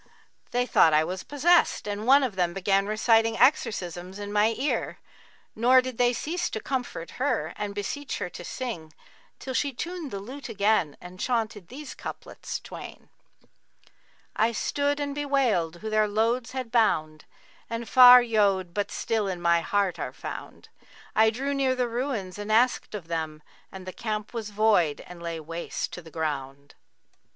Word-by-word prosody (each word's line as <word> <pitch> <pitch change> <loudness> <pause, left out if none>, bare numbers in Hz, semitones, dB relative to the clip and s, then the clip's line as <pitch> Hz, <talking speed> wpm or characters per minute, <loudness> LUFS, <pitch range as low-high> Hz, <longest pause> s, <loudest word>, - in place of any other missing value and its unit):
They 245 0 0
thought 160 -9 +5
I 155 - +4
was 180 +3 -4
possessed[FN#45] 295 -7 +2
and 205 +3 -5
one 275 +2 +7
of 240 -7 -2
them 175 -1 0
began 195 +1 +1
reciting 225 +1 +3
exorcisms 185 - +1
in 205 0 -6
my 215 +2 +3
ear; 280 +4 -1 0.6
nor 250 +4 +5
did 255 -2 -4
they 245 0 +4
cease 335 +9 -2
to 220 - -4
comfort 245 -10 -4
her 170 - 0
and 205 -1 -4
beseech 275 +8 -4
her - - -3
to 175 - -9
sing, 175 - -6 0.4
till 260 - -6
she 280 +2 0
tuned 335 +4 -5
the 200 - -5
lute 260 +8 -8
again 200 -7 +1
and 180 +1 -12
chaunted 220 -6 -2
these 275 +2 -8
couplets - - -7
twain, - - -10 1.3
'I 225 +2 +2
stood 285 +5 0
and 285 -1 -2
bewailed 265 - +1
who 220 +6 -6
their 215 0 +3
loads 230 +4 0
had 255 -3 -4
bound 155 -10 +1 0.2
* - - -29
And 230 0 -4
far 250 -1 +9
yode 200 -6 +1
but 205 +1 -1
still 220 -3 -1
in 185 -2 -3
my 170 -1 +3
heart 195 -2 0
are - - -4
found; - - -8 0.5
I 220 0 +6
drew 270 +5 -2
near 270 -2 +1
the 250 -1 0
ruins 230 -6 -3
and 205 +1 -4
asked 235 0 +2
of 185 -6 -7
them 160 -2 -4
* - - -31
And 190 -1 -9
the 185 - -7
camp 215 -1 -4
was 225 -3 -4
void 205 -8 +2
and 175 -1 -11
lay 170 -1 -4
waste 165 +2 -5
the 160 - -12
ground.' 140 -3 -4
215 Hz, 170 wpm, -26 LUFS, 180-250 Hz, 1.3 s, far